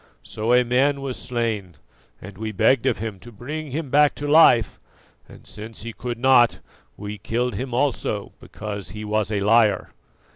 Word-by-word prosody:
So 110 Hz, +2 st, -3 dB
a 125 Hz, 0 st, +5 dB
man 135 Hz, +3 st, +1 dB
was 135 Hz, -2 st, -4 dB
slain 110 Hz, -8 st, -3 dB, 0.4 s
and 100 Hz, +1 st, -11 dB
we 110 Hz, +2 st, -5 dB
begged 110 Hz, +4 st, +2 dB
of -, -, +1 dB
him 110 Hz, -2 st, -5 dB
to 120 Hz, -, -12 dB
bring 145 Hz, +8 st, -6 dB
him 145 Hz, 0 st, -5 dB
back 150 Hz, 0 st, +4 dB
to 145 Hz, -, -5 dB
life; 145 Hz, -, +5 dB, 0.5 s
and -, -, -15 dB
since 110 Hz, 0 st, -9 dB
he 115 Hz, 0 st, -6 dB
could 120 Hz, 0 st, -5 dB
not, 120 Hz, -1 st, +4 dB, 0.4 s
we 105 Hz, 0 st, -7 dB
killed 120 Hz, +4 st, -2 dB
him 125 Hz, +6 st, -5 dB
also 120 Hz, -5 st, -1 dB
because 105 Hz, -2 st, -7 dB
he 105 Hz, 0 st, -7 dB
was 105 Hz, 0 st, -1 dB
a 105 Hz, -2 st, -1 dB
liar." 105 Hz, -1 st, +3 dB
115 Hz, 175 wpm, -23 LUFS, 105-130 Hz, 0.5 s, a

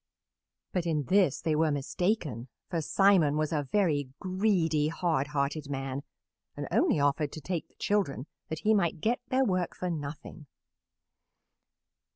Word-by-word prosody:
But 175 Hz, -2 st, -1 dB
in 155 Hz, -3 st, +1 dB
this 185 Hz, -2 st, +3 dB
they 155 Hz, -2 st, +1 dB
were 160 Hz, +1 st, +3 dB
mistaken, 145 Hz, -, -1 dB, 0.2 s
for 170 Hz, -2 st, 0 dB
Simon 175 Hz, -4 st, +4 dB
was 155 Hz, +1 st, 0 dB
a 145 Hz, -3 st, -1 dB
very 150 Hz, -10 st, +2 dB
greedy, 185 Hz, -6 st, +1 dB
hard 160 Hz, -4 st, 0 dB
hearted 145 Hz, 0 st, -2 dB
man 135 Hz, 0 st, -3 dB, 0.6 s
and -, -, -4 dB
only -, -, +3 dB
offered 145 Hz, +1 st, +1 dB
to -, -, -6 dB
take 170 Hz, +2 st, -3 dB
the -, -, -34 dB
children 185 Hz, -11 st, 0 dB, 0.2 s
that 160 Hz, -, -4 dB
he 220 Hz, -, +3 dB
might 175 Hz, -5 st, +1 dB
get 230 Hz, +8 st, +1 dB
their 260 Hz, +1 st, +3 dB
work 185 Hz, -4 st, 0 dB
for 180 Hz, -1 st, -3 dB
nothing. 150 Hz, 0 st, -7 dB
160 Hz, 150 wpm, -29 LUFS, 145-185 Hz, 0.6 s, Simon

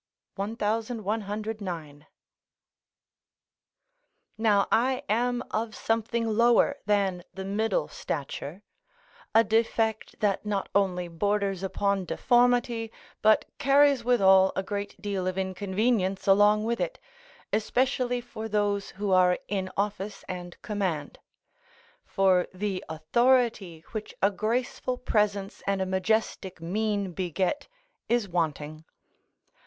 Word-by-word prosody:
1109.] 210 Hz, -, -3 dB, 2.3 s
Now 210 Hz, -3 st, +3 dB
I 255 Hz, +3 st, +2 dB
am 245 Hz, +3 st, +1 dB
of 220 Hz, -1 st, -2 dB
something 230 Hz, +1 st, -1 dB
lower 235 Hz, +5 st, +3 dB
than 195 Hz, -4 st, +1 dB
the 190 Hz, 0 st, -5 dB
middle 220 Hz, -, 0 dB
stature, -, -, -5 dB, 0.7 s
a 225 Hz, -, +7 dB
defect 220 Hz, 0 st, 0 dB
that 205 Hz, -2 st, +1 dB
not 205 Hz, -2 st, -2 dB
only 180 Hz, -3 st, +1 dB
borders 195 Hz, +2 st, -1 dB
upon 195 Hz, 0 st, 0 dB
deformity, 240 Hz, 0 st, +2 dB, 0.3 s
but 215 Hz, 0 st, +4 dB
carries 275 Hz, -2 st, +4 dB
withal 190 Hz, -6 st, +5 dB
a 190 Hz, -, -1 dB
great 200 Hz, +1 st, -5 dB
deal 195 Hz, -3 st, -2 dB
of 185 Hz, 0 st, -2 dB
inconvenience 190 Hz, +1 st, 0 dB
along 205 Hz, +2 st, +5 dB
with 235 Hz, +1 st, -1 dB
it, -, -, -2 dB, 0.6 s
especially 245 Hz, +2 st, +1 dB
for 225 Hz, -2 st, -7 dB
those 205 Hz, -1 st, 0 dB
who 205 Hz, -1 st, -1 dB
are 180 Hz, -1 st, +5 dB
in 190 Hz, -2 st, -2 dB
office 200 Hz, 0 st, -3 dB
and 175 Hz, -1 st, -7 dB
command; 185 Hz, -9 st, -3 dB, 0.8 s
for 190 Hz, -2 st, +2 dB
the 195 Hz, -1 st, -2 dB
authority 195 Hz, 0 st, +1 dB
which 215 Hz, -2 st, -6 dB
a 200 Hz, -, +3 dB
graceful 245 Hz, +4 st, -2 dB
presence 205 Hz, -4 st, 0 dB
and 200 Hz, -1 st, +1 dB
a 190 Hz, -, 0 dB
majestic 190 Hz, -1 st, -1 dB
mien 200 Hz, +3 st, -1 dB
beget 185 Hz, -, -2 dB, 0.4 s
is 235 Hz, -3 st, +2 dB
wanting. 155 Hz, -3 st, -2 dB
205 Hz, 105 wpm, -27 LUFS, 190-225 Hz, 2.3 s, a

